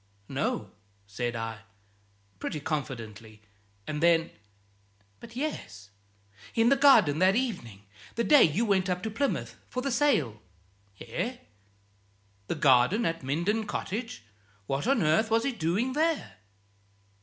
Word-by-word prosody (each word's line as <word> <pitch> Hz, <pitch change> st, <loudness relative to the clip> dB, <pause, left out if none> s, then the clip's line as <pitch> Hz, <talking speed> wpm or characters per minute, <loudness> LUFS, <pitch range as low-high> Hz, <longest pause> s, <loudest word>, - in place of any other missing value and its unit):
"No," -, -, -2 dB, 0.3 s
said 120 Hz, +5 st, -4 dB
I, 115 Hz, -1 st, -4 dB, 0.8 s
pretty 155 Hz, -, -4 dB
confidently, 115 Hz, -8 st, -5 dB, 0.4 s
and 150 Hz, 0 st, -4 dB
then 165 Hz, -1 st, +3 dB, 0.9 s
"But, 235 Hz, 0 st, -12 dB
yes 245 Hz, -, -5 dB, 0.6 s
in 230 Hz, +1 st, +4 dB
the 275 Hz, -, +5 dB
garden, 225 Hz, -, +5 dB
that 185 Hz, +2 st, +4 dB
evening 180 Hz, -, -3 dB, 0.3 s
the 235 Hz, -, 0 dB
day 295 Hz, +3 st, +6 dB
you 175 Hz, +10 st, +3 dB
went 190 Hz, -3 st, +1 dB
up 180 Hz, 0 st, -2 dB
to 220 Hz, -, -3 dB
Plymouth 275 Hz, +6 st, -2 dB
for 255 Hz, -, -4 dB
the 275 Hz, -, -1 dB
sale!" 160 Hz, -, +1 dB, 0.6 s
"Eh? 250 Hz, +1 st, -4 dB, 1.1 s
The -, -, -2 dB
garden 145 Hz, -, +4 dB
at 165 Hz, 0 st, -1 dB
Minden 175 Hz, +11 st, -1 dB
Cottage? 205 Hz, -, -4 dB, 0.4 s
What 135 Hz, -, -2 dB
on 265 Hz, -6 st, +3 dB
earth 160 Hz, +9 st, +3 dB
was 225 Hz, +1 st, +2 dB
he 275 Hz, -, 0 dB
doing 215 Hz, +5 st, -1 dB
there?" 320 Hz, +2 st, -1 dB
185 Hz, 130 wpm, -28 LUFS, -, 1.1 s, day